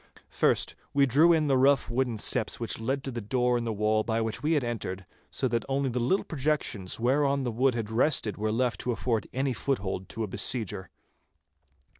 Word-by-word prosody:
First - - +1 0.2
we 140 -1 +5
drew 150 +7 +5
in 160 -2 +3
the 135 -3 +2
rough 135 +1 +4
wooden 120 -1 -1
steps 110 +2 +1
which 115 -2 -3
led 135 +4 -2
to 135 - -4
the 120 -1 -5
door 125 +3 +1
in 120 -1 -1
the 115 - -1
wall 110 +1 +1
by 115 0 -1
which 110 -1 -3
we 155 +2 +1
had 145 -4 +1
entered, 95 -5 -4 0.2
so 130 - -1
that 115 0 0
only 135 0 0
the 125 - -1
little 130 +12 +1
projections 135 - -2
whereon 140 +3 +2
the 120 - -1
wood 125 +2 +1
had 110 -2 -4
rested 115 -2 +2
were 110 +1 -2
left 120 +1 0
to 125 - -2
afford 115 -1 -1 0.3
foothold 95 -8 -2
to 115 - -4
any - - -2
besieger. 105 -2 -2
120 Hz, 200 wpm, -28 LUFS, 110-135 Hz, 0.3 s, we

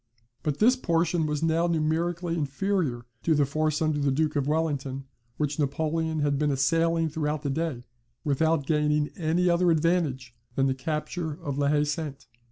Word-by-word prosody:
But 150 -3 -1
this 245 +4 +5
portion 170 -7 +1
was 150 +1 -2
now 165 +1 +2
numerically 170 +2 0
inferior 145 -4 -1 0.2
to 160 - +2
the 145 -1 +3
force 155 +2 0
under 155 -1 +1
the 140 -1 +1
Duke 150 +3 0
of 140 -1 0
Wellington, 145 -4 -1 0.3
which 150 0 -1
Napoleon 160 +2 0
had 145 -1 +1
been 150 -1 +2
assailing 165 +4 +2
throughout 150 -1 -2
the 140 - -1
day, 150 -4 -2 0.4
without 155 +1 +1
gaining 150 0 +1
any 175 +2 +1
other 175 0 +3
advantage 155 -7 +1 0.2
than 135 - +2
the 135 - +2
capture 150 +4 -3
of 145 -1 -5
La 140 - +2
Haye 145 0 +3
Sainte. 150 -1 -4
155 Hz, 170 wpm, -27 LUFS, 145-165 Hz, 0.4 s, this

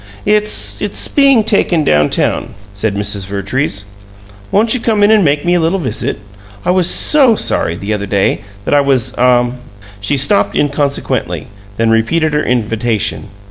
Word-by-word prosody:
"It's 210 0 +1
it's - - -1
being 275 -5 +3
taken 190 -6 +1
down 75 - +2
town," - - -2 0.2
said 100 +1 -2
Mrs. 100 -1 -1
Vertrees. 100 +2 -3 0.7
"Won't 220 +2 +2
you 255 - +1
come 220 -3 0
in 205 - +5
and 215 -2 +4
make 145 0 0
me 175 - +2
a 175 - +2
little 165 +4 0
visit. 145 - -3 0.5
I - - +2
was 185 -1 +2
SO 270 -7 +4
sorry, 85 - -1
the 100 +4 -4
other 100 -1 -4
day, 100 +1 0 0.2
that - - -1
I 145 - +5
was 135 -4 0
ah 125 -1 +3 0.2
" 100 0 -20
She 140 +8 -1
stopped 100 -7 +1
inconsequently, 145 -1 -2 0.3
then 115 0 +1
repeated 150 +8 +1
her 150 - +1
invitation. 115 -3 -2
135 Hz, 170 wpm, -13 LUFS, -, 0.7 s, in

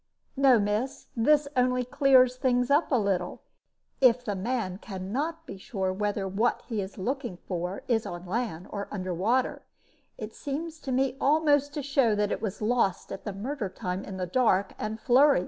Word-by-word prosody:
"No, 270 -3 +6
miss; 210 +6 -2
this 290 +5 +3
only 250 0 +2
clears 260 -2 +4
things 250 0 +1
up 295 +3 +3
a - - +4
little. 190 -4 -1 0.6
If 250 -1 +5
the 205 - -1
man 195 -2 -2
can 190 -3 -7
not 320 +6 -2
be 195 - -9
sure 190 -2 -2
whether 205 0 -1
what 210 +6 0
he 220 -4 -2
is 190 +2 -7
looking 240 -1 -3
for 180 +1 -4
is 225 -3 +1
on 175 +1 -7
land 190 -3 -3
or 200 0 -4
under 185 -3 -3
water, 230 +9 0 0.6
it 215 0 -7
seems 315 +3 -5
to 270 - -5
me 260 0 +1
almost 290 -1 +3
to 295 - -3
show 265 -5 +2
that 210 0 0
it - - -2
was 215 -1 -4
lost 215 -5 +1
at 195 - -7
the 205 - -3
murder 220 +2 -4
time 185 -1 -4
in 190 - -7
the 185 - -2
dark 195 -1 +2
and 215 +1 -3
flurry. 270 +3 +5
230 Hz, 185 wpm, -28 LUFS, 195-265 Hz, 0.6 s, No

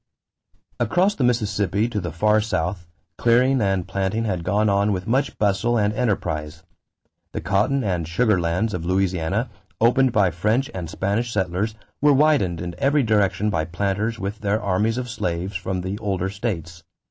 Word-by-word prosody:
= - - -43
Across 185 - +2
the 140 - -2
Mississippi 105 -3 +1
to 105 -4 -2
the 85 -1 -4
far 105 +6 +2
south, 90 -4 -2 0.3
clearing 125 +2 +3
and 95 -3 0
planting 100 +4 -1
had 90 -5 -2
gone 100 +5 +1
on 100 +1 +2
with 90 -2 -2
much 130 +5 0
bustle 105 +4 +1
and 105 -1 +1
enterprise. 80 -9 -2 0.7
The - - -3
cotton 105 - +1
and 90 -6 -1
sugar 95 +2 +2
lands 90 +6 0
of 90 - -3
Louisiana, 95 +4 0 0.3
opened 125 +3 +4
by 100 -5 +3
French 110 - 0
and 90 -4 -5
Spanish 100 +7 -1
settlers, 95 +2 -1 0.3
were 145 0 +5
widened 130 - +2
in 90 -1 -4
every 140 +1 +3
direction 105 -1 +1
by 80 -4 0
planters 100 +6 -2
with 100 +1 -4
their 105 +1 0
armies 105 +3 0
of 125 -1 -3
slaves 90 -4 -3
from 90 +1 -2
the 95 +3 -4
older 95 -3 -2
states. 90 -6 -4
100 Hz, 170 wpm, -23 LUFS, 90-115 Hz, 0.7 s, were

